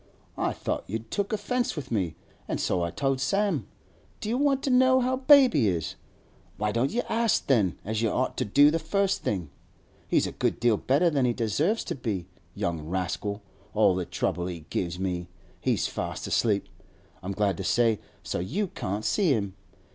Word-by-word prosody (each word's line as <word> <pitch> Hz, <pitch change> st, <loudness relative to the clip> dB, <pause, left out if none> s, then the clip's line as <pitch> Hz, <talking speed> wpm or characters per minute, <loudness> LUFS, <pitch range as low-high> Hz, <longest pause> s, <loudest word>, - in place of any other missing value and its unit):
I -, -, +1 dB
thought -, -, -3 dB
you'd 110 Hz, +2 st, -5 dB
took 200 Hz, -1 st, -1 dB
offence 245 Hz, +3 st, -1 dB
with 135 Hz, -5 st, -6 dB
me, 90 Hz, -8 st, 0 dB, 0.3 s
an' -, -, -1 dB
so 90 Hz, -, 0 dB
I 85 Hz, -, 0 dB
told 135 Hz, -, -1 dB
Sam. 200 Hz, +8 st, +1 dB, 0.5 s
Do 215 Hz, -, -4 dB
you 240 Hz, -, +1 dB
want 280 Hz, -2 st, +2 dB
to 270 Hz, -, +1 dB
know 260 Hz, +1 st, +5 dB
how 255 Hz, +1 st, +1 dB
baby 260 Hz, -, +6 dB
is? 85 Hz, -5 st, -1 dB, 0.6 s
Why 105 Hz, 0 st, 0 dB
don't 120 Hz, +5 st, +1 dB
you 245 Hz, +2 st, -1 dB
ask, 230 Hz, 0 st, +1 dB
then, 105 Hz, -10 st, +2 dB
as 110 Hz, +1 st, -1 dB
you 115 Hz, -, +2 dB
ought 130 Hz, +5 st, -1 dB
to -, -, +1 dB
do 145 Hz, +8 st, +6 dB
the 165 Hz, -, 0 dB
first 195 Hz, +4 st, 0 dB
thing? 90 Hz, -8 st, -2 dB, 0.6 s
He's -, -, +2 dB
a -, -, -3 dB
good -, -, -1 dB
deal 120 Hz, -1 st, +4 dB
better 145 Hz, -, +2 dB
than 140 Hz, -4 st, +2 dB
he 120 Hz, -, +2 dB
deserves 140 Hz, -, 0 dB
to -, -, -3 dB
be, 110 Hz, -9 st, -3 dB, 0.3 s
young 85 Hz, -2 st, -2 dB
rascal—all 95 Hz, +3 st, -1 dB
the 90 Hz, -1 st, -2 dB
trouble 90 Hz, +1 st, -2 dB
he 85 Hz, -4 st, -6 dB
gives 85 Hz, -1 st, -2 dB
me! 90 Hz, -2 st, -2 dB, 0.3 s
He's -, -, +1 dB
fast -, -, -4 dB
asleep, 105 Hz, -4 st, +1 dB, 0.5 s
I'm 95 Hz, +2 st, -4 dB
glad 100 Hz, -1 st, +1 dB
to 95 Hz, -, -4 dB
say, 115 Hz, -1 st, +2 dB, 0.2 s
so -, -, -3 dB
you 180 Hz, -, -2 dB
can't 105 Hz, -, -4 dB
see 200 Hz, -5 st, +2 dB
him. 100 Hz, -5 st, -2 dB
115 Hz, 185 wpm, -27 LUFS, -, 0.6 s, baby